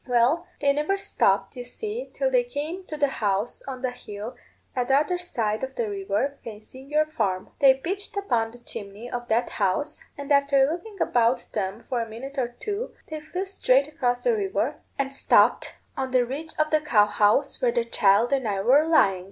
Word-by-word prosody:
Well, 250 +8 +2
they 280 -1 +3
never 300 +7 0
stopped, 195 - +1
you 245 - -6
see, 430 - -5
till - - 0
they - - +4
came 355 -4 -5
to 305 - -5
the 290 -1 +3
house 205 +2 0
on 260 -1 -6
the 255 - 0
hill 215 -2 -8 0.4
at 250 -1 0
the 270 - +4
other 330 +5 +1
side 225 -10 -2
of 265 0 -4
the 235 - -1
river, 205 +8 -2
facing 235 +6 -11
our 305 0 +5
farm. 200 -11 -2
They 270 -2 +7
pitched 380 +9 -4
upon 240 - 0
the 235 - -14
chimney 225 -1 -8
of 240 0 -4
that 230 +2 +1
house, 215 +10 -1 0.2
and 285 0 -6
after 280 -1 +5
looking 360 +7 -5
about 240 -2 +2
them 200 +2 -3
for 250 -3 -1
a 230 - -5
minute 265 +5 -6
or 250 - +1
two, 410 - -5 0.2
they 310 - -3
flew 360 +5 -4
straight 280 -8 +2
across 250 -6 -1
the 480 -2 +3
river, 395 -2 -1 0.2
and 275 0 -2
stopped 275 - +3 0.2
on 265 -1 -2
the 255 -1 +3
ridge 300 +6 -6
of 310 0 +1
the 310 -1 +3
cow 220 -9 +4
house 210 +7 +2
where - - +3
the 475 -1 0
child 205 +6 +3
and 265 -4 +1
I 200 -2 -1
were 275 +9 +4
lying. 195 - +4
265 Hz, 200 wpm, -25 LUFS, 230-310 Hz, 0.4 s, They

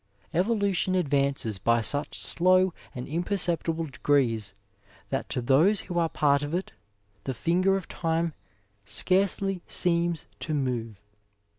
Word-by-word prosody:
Evolution 195 0 +1
advances 140 - 0
by 115 +3 +3
such 145 +6 -3
slow 185 +1 +2 0.2
and 125 0 -5
imperceptible 170 -1 0
degrees 125 -8 0 0.6
that - - -2
to 125 - -2
those 160 - +4
who 175 -2 -3
are 165 -1 +1
part 140 -2 +2
of 145 +3 -3
it 185 - -3 0.5
the 130 - -3
finger 185 +8 +2
of 190 - -7
time 165 -1 -1 0.5
scarcely 190 - +2
seems 170 -1 +1
to 155 - -3
move. 115 -7 -3
165 Hz, 125 wpm, -27 LUFS, 135-185 Hz, 0.6 s, those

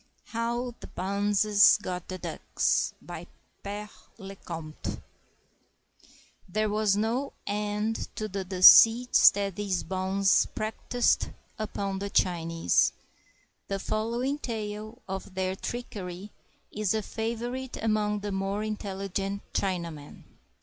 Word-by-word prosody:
HOW 235 +2 -2
THE - - -9
BONZES 205 +2 +4
GOT 180 -1 -4
THE 185 - -5
DUCKS - - -1
BY - - -8 0.3
PERE 205 +1 -5 0.3
LE 195 0 -9
COMTE 165 -4 -6 1.5
[There 215 +3 0
was 210 -1 +2
no 235 +6 -1
end 210 +2 -2
to 215 - -3
the 200 -1 -4
deceits 225 +6 +8
that 200 -2 -3
these 195 -3 -1
bonzes 190 +2 +2
practiced 225 +3 0 0.3
upon 200 -2 -3
the 200 +1 -3
Chinese. 165 - +2 0.7
The 195 - -1
following 235 +8 -1
tale 215 -2 -5
of 190 0 -6
their 185 0 -1
trickery 200 -4 -6 0.4
is 210 -1 0
a 215 - -1
favorite 240 +4 -4
among 210 -2 0
the 205 0 -3
more 195 +2 -2
intelligent 200 -1 -3
Chinamen. 170 -6 -3
205 Hz, 110 wpm, -28 LUFS, 190-215 Hz, 1.5 s, deceits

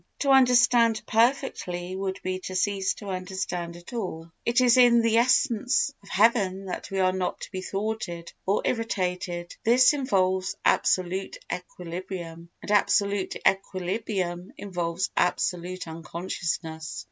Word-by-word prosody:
To 280 - +3
understand 245 -3 +5
perfectly 215 -7 0
would 190 0 -3
be 185 0 -2
to 185 - -5
cease 195 0 0
to 205 - -8
understand 185 -2 -4
at 175 +6 -12
all. 170 -7 -5
It 235 +2 +2
is 245 -2 +5
in 240 -2 +6
the 230 0 +3
essence 250 +2 +2
of 200 - -16
heaven 195 -3 +2
that 185 - -5
we 195 - -4
are 185 -1 +3
not 185 -1 -3
to - - -8
be 185 -1 -4
thwarted 195 -4 -4
or 195 - +1
irritated, 180 -6 -2
this 250 +4 +6
involves 190 -9 0
absolute 185 +1 +1 0.2
equilibrium 175 -1 -7
and - - -4
absolute 200 -1 +2
equilibrium 185 -1 -1
involves 175 -2 -3
absolute 180 0 -1
unconsciousness. 160 - -4
190 Hz, 130 wpm, -26 LUFS, 180-225 Hz, 0.2 s, in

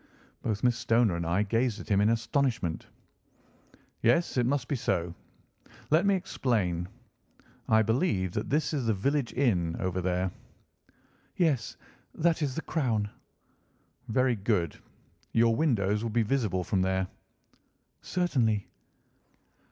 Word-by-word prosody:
Both 105 -2 -2
Miss 120 -1 +2
Stoner 115 -5 +3
and 85 -1 -3
I 95 +5 +2
gazed 115 +1 0
at - - -9
him 100 -1 +3
in 105 - +4
astonishment. 115 - 0 1.1
"Yes, 125 +9 +2
it 120 -2 +2
must 135 -1 0
be 145 - -1
so. 90 -8 -1 0.8
Let 165 +6 +4
me 200 - +4
explain. 95 - -1 0.8
I 110 0 +5
believe 110 - +1
that 105 - -3
that 150 +2 +1
is 135 -6 -1
the 110 - +2
village 140 +6 0
inn 90 -11 +1
over 95 -1 -1
there?" 90 +1 0 1.1
"Yes, 150 -10 +1 0.4
that 170 0 +1
is 140 -4 -1
the 160 - -3
Crown." 110 -10 -1 1.0
"Very 125 +2 +2
good. 95 -6 0 0.6
Your 115 0 +4
windows 105 -8 +1
would 115 -2 -3
be 115 -1 +3
visible 105 -6 0
from 95 +1 0
there?" 95 0 0 0.9
"Certainly." 120 - 0
115 Hz, 130 wpm, -29 LUFS, 95-130 Hz, 1.1 s, I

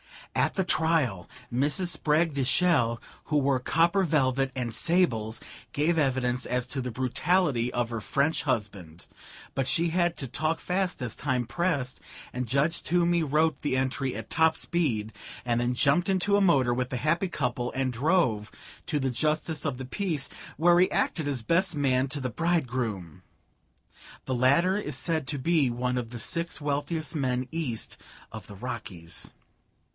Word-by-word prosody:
"'At - - +1
the 190 - +1
trial 160 - +1 0.2
Mrs. 145 +8 +1
Spragg 160 -1 +2
de 140 -1 0
Chelles, 125 -6 +3 0.3
who 150 - +1
wore 140 -2 +2
copper 170 +8 +2
velvet 135 -5 +1
and 120 -3 -3
sables, 115 -11 +1 0.3
gave 160 +3 +2
evidence 125 -3 0
as 125 -1 -1
to 135 +1 -3
the 125 - -3
brutality 130 +1 +1
of 120 -1 -1
her 115 -1 -3
French 140 +7 0
husband, 100 - -3 0.5
but 135 -1 -1
she 170 +3 +2
had 175 0 +1
to 135 - -3
talk 155 +6 -1
fast 180 -3 -1
as 115 - -3
time 130 -4 -1
pressed, 135 0 -1 0.3
and 125 0 -3
Judge 140 +6 +1
Toomey 175 0 +2
wrote 155 0 +1
the 145 -3 0
entry 130 0 -1
at 110 0 -7
top 160 0 +4
speed, 115 -11 0 0.3
and 120 -1 +1
then 125 +1 0
jumped 155 +9 +3
into 195 +2 +2
a - - +2
motor 135 -10 +4
with 125 0 -1
the 130 - -3
happy 170 +8 +1
couple 125 -6 -2
and 130 -1 -1
drove 120 - +1 0.4
to 150 - 0
the 135 -1 0
Justice 155 +4 -1
of 140 -5 -1
the 130 - -6
Peace, 160 -1 -2 0.3
where 175 +2 +5
he 185 - +5
acted 155 -3 0
as 135 -5 -1
best 175 - +2
man 135 -2 +2
to 140 +1 -4
the 130 - -2
bridegroom. 120 - -1 1.0
The 130 - -2
latter 140 +10 +3
is 150 -10 -4
said 160 -2 -1
to 145 - -1
be 150 -1 +2
one 125 +1 -1
of 120 -2 -3
the 120 0 -7
six 170 +7 -1
wealthiest 145 +1 -2
men 130 -3 -1
east 150 -9 -3 0.3
of - - -9
the 100 - -10
Rockies. 95 -7 -5
140 Hz, 170 wpm, -27 LUFS, 125-165 Hz, 1.0 s, where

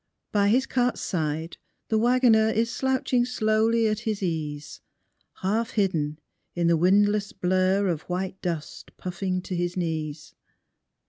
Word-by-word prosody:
By 200 -1 +3
his 255 +5 +3
cart's 250 -1 0
side 160 -1 -3 0.3
the 220 - +2
wagoner 235 -2 +4
Is 225 +1 0
slouching 260 -2 +1
slowly 225 -1 +2
at 215 -1 +1
his 215 -3 -3
ease, 150 -4 -4 0.6
Half 220 +5 0
hidden 160 -8 0 0.4
in 175 -1 0
the 170 0 +4
windless 205 +4 +3
blur 185 +1 +1
Of 165 -4 -1
white 185 +1 -3
dust 165 -4 -5
puffing 185 0 -3
to 185 - -4
his 175 +1 -2
knees. 155 -2 -3
190 Hz, 135 wpm, -26 LUFS, 170-220 Hz, 0.6 s, wagoner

